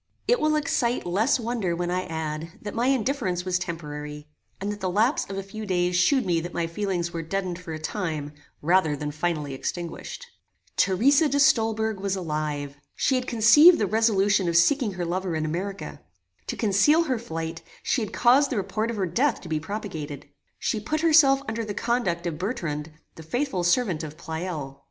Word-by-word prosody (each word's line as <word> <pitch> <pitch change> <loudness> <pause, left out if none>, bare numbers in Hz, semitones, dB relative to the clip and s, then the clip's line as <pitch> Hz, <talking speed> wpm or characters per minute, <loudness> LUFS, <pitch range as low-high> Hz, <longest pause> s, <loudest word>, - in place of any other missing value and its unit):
It - - +3
will 305 -3 +2
excite 255 -5 0
less 205 +10 +2
wonder 225 -7 -1
when 175 0 -2
I 185 +1 -1
add, 160 0 -4
that 205 - -5
my 235 +2 0
indifference 240 -9 0
was 180 -1 +1
temporary, 150 -4 -6 0.3
and 200 +2 -2
that 205 - -6
the 185 - -1
lapse 220 +9 +2
of 195 - -5
a 195 - -3
few 215 +3 -8
days 180 -3 0
shewed 260 +8 +3
me 170 -2 +2
that 175 +2 -6
my 170 - 0
feelings 175 -1 -2
were 165 - -3
deadened 180 +1 -3
for 170 -2 -8
a 160 - -3
time, 155 -4 -4 0.3
rather 170 -2 +3
than 150 +1 -4
finally 150 -2 -2
extinguished. 175 - -5 0.5
Theresa 275 - +4
de 285 - +1
Stolberg 220 -6 +2
was 195 0 -1
alive. 150 -5 -3 0.2
She 270 - +1
had 255 -1 0
conceived 245 +10 +7
the 210 - +1
resolution 205 -3 +2
of 170 - +2
seeking 225 +4 +3
her 175 -1 -3
lover 180 0 -2
in 155 0 -1
America. 190 +5 -4 0.5
To - - -3
conceal 230 - +4
her 260 -7 -1
flight, 165 -5 -5 0.2
she 255 - +1
had 215 - -4
caused 260 +4 +4
the 250 - -2
report 215 +3 -1
of 230 - -3
her 195 - +1
death 255 - +1
to 170 - -10
be 155 -1 0
propagated. 160 -6 -6 0.3
She 220 - -1
put 305 +9 -2
herself 295 -4 +5
under 225 +1 -2
the 210 -2 -5
conduct 195 -9 -1
of 165 -3 -3
Bertrand, 170 - -3 0.2
the - - -11
faithful 215 - -2
servant 175 -2 +1
of 155 0 -7
Pleyel. 160 -5 -5
190 Hz, 190 wpm, -25 LUFS, 165-230 Hz, 0.5 s, conceived